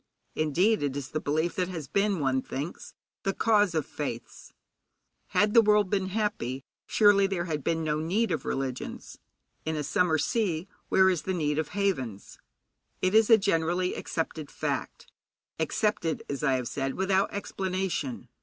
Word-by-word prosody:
Indeed, 175 Hz, +8 st, +2 dB
it 145 Hz, -1 st, -1 dB
is 140 Hz, -1 st, -5 dB
the 155 Hz, -, -1 dB
belief 155 Hz, +4 st, 0 dB
that 180 Hz, -1 st, +1 dB
has 165 Hz, -6 st, -6 dB
been, 200 Hz, -2 st, +1 dB
one 130 Hz, -2 st, +1 dB
thinks, 145 Hz, +7 st, -6 dB, 0.3 s
the 195 Hz, -, -1 dB
cause 205 Hz, -6 st, +3 dB
of 155 Hz, -, 0 dB
faiths. 130 Hz, -6 st, -6 dB, 0.8 s
Had 210 Hz, 0 st, +2 dB
the 230 Hz, -, +8 dB
world 210 Hz, -3 st, +3 dB
been 195 Hz, -2 st, +1 dB
happy, 190 Hz, -, -2 dB, 0.2 s
surely 205 Hz, -2 st, +5 dB
there 185 Hz, -3 st, -2 dB
had 155 Hz, -4 st, -3 dB
been 165 Hz, -1 st, 0 dB
no 150 Hz, -1 st, 0 dB
need 185 Hz, +7 st, 0 dB
of 160 Hz, -, -1 dB
religions. 135 Hz, -1 st, -4 dB, 0.4 s
In 160 Hz, 0 st, -2 dB
a 150 Hz, -, -2 dB
summer 160 Hz, +3 st, +2 dB
sea, 180 Hz, 0 st, 0 dB, 0.2 s
where 190 Hz, 0 st, +5 dB
is 175 Hz, -4 st, -1 dB
the 190 Hz, -, -2 dB
need 150 Hz, -3 st, 0 dB
of 155 Hz, -, -1 dB
havens? 130 Hz, -, -2 dB, 0.6 s
It 185 Hz, +1 st, +1 dB
is 220 Hz, 0 st, +5 dB
a 225 Hz, -, +9 dB
generally 180 Hz, -2 st, +1 dB
accepted 160 Hz, -2 st, -4 dB
fact, -, -, -3 dB, 0.5 s
accepted, 165 Hz, 0 st, 0 dB
as 140 Hz, +1 st, -4 dB
I 135 Hz, -3 st, +3 dB
have 125 Hz, -2 st, -1 dB
said, 135 Hz, +1 st, -2 dB
without 190 Hz, +1 st, +1 dB
explanation. 185 Hz, -10 st, -3 dB
170 Hz, 165 wpm, -28 LUFS, 150-195 Hz, 0.8 s, a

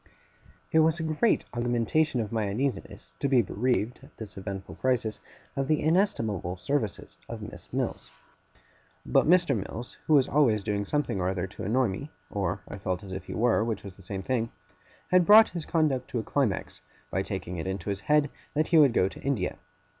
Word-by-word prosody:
It 160 Hz, -, +5 dB
was 160 Hz, +1 st, +3 dB
a -, -, -2 dB
great 160 Hz, +8 st, +2 dB
augmentation 120 Hz, +4 st, +1 dB
of 105 Hz, -, -4 dB
my 110 Hz, -3 st, 0 dB
uneasiness 120 Hz, +1 st, -3 dB
to -, -, +1 dB
be 130 Hz, -3 st, +4 dB
bereaved, 120 Hz, +3 st, -1 dB
at -, -, -18 dB
this 105 Hz, -4 st, -8 dB
eventful 95 Hz, 0 st, -6 dB
crisis, 120 Hz, -5 st, 0 dB, 0.4 s
of 135 Hz, -1 st, -1 dB
the 155 Hz, 0 st, +2 dB
inestimable 115 Hz, -, +1 dB
services 130 Hz, 0 st, -2 dB
of -, -, -6 dB
Miss -, -, -9 dB
Mills. -, -, -3 dB, 1.0 s
But -, -, +3 dB
Mr. 170 Hz, -5 st, +5 dB
Mills, 115 Hz, +3 st, -6 dB
who 155 Hz, -, +5 dB
was 135 Hz, -2 st, +5 dB
always 120 Hz, -9 st, +3 dB
doing 100 Hz, -1 st, -1 dB
something 145 Hz, -6 st, -1 dB
or 90 Hz, -, +1 dB
other 95 Hz, -1 st, -1 dB
to 95 Hz, -, -9 dB
annoy 120 Hz, +3 st, +2 dB
me 140 Hz, +10 st, -5 dB, 0.2 s
or 95 Hz, -1 st, -2 dB
I 100 Hz, -, -7 dB
felt 95 Hz, -1 st, -2 dB
as 95 Hz, -, -9 dB
if 95 Hz, 0 st, -5 dB
he -, -, -6 dB
were, 115 Hz, -1 st, +3 dB
which 110 Hz, -3 st, -3 dB
was 100 Hz, -2 st, -9 dB
the 100 Hz, -, -16 dB
same 95 Hz, +1 st, -5 dB
thing 115 Hz, 0 st, -1 dB, 0.6 s
had 180 Hz, 0 st, +6 dB
brought 215 Hz, +4 st, +8 dB
his 170 Hz, -3 st, -6 dB
conduct 150 Hz, -6 st, +1 dB
to -, -, -3 dB
a -, -, -3 dB
climax, 125 Hz, -8 st, -1 dB, 0.3 s
by -, -, 0 dB
taking 90 Hz, +1 st, -4 dB
it 85 Hz, -, -4 dB
into 95 Hz, +1 st, -3 dB
his 100 Hz, -, -3 dB
head 150 Hz, +6 st, +2 dB, 0.2 s
that 155 Hz, +1 st, +1 dB
he 165 Hz, -, +6 dB
would 140 Hz, -5 st, +6 dB
go 95 Hz, -, +3 dB
to -, -, -9 dB
India. 130 Hz, -10 st, -1 dB
115 Hz, 200 wpm, -28 LUFS, 100-145 Hz, 1.0 s, brought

